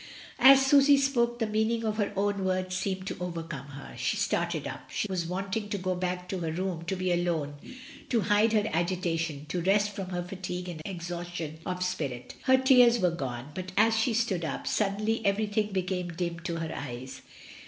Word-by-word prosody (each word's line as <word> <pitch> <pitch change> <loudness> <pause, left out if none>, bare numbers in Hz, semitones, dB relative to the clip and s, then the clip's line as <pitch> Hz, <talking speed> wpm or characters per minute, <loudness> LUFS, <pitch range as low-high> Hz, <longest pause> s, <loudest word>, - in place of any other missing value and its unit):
As 270 +2 +8
Susy 280 +1 +6
spoke 240 -4 +1
the 230 - 0
meaning 220 +2 0
of 215 -1 -1
her 205 -2 0
own 200 0 0
words 185 0 -1
seemed 190 0 -2
to - - -4
overcome 165 -5 -5
her. 145 0 -10
She - - -1
started - - 0
up. - - -8
She - - -2
was 180 -4 -2
wanting 195 +4 -3
to 205 - -1
get 185 -1 -2
back 180 0 -2
to 190 - -2
her 165 - -3
own 160 - -2
room, 180 -2 -3
to 190 - -1
be 185 -1 -1
alone, 170 -4 0 0.6
to 235 -3 +2
hide 210 +3 +3
her 210 -1 +3
agitation, 165 -3 -1
to 175 +2 -1
rest 205 +3 +3
from 195 -2 -5
her 175 -1 -2
fatigue 180 0 -5
and 160 -3 -6
exhaustion 175 -3 -5
of 180 0 -2
spirit. 135 -9 -3
Her 260 0 +6
tears 250 -2 +6
were 180 -3 +3
gone, 135 -4 -5
but 185 +2 -6
as 220 +2 +5
she 225 +1 +1
stood 210 -7 0
up, 160 - -3
suddenly 215 +2 0
everything 205 +1 +1
became 185 -1 -1
dim 170 0 -3
to 170 0 -4
her 165 -1 -3
eyes. 130 -1 -7
185 Hz, 195 wpm, -29 LUFS, 170-210 Hz, 0.6 s, As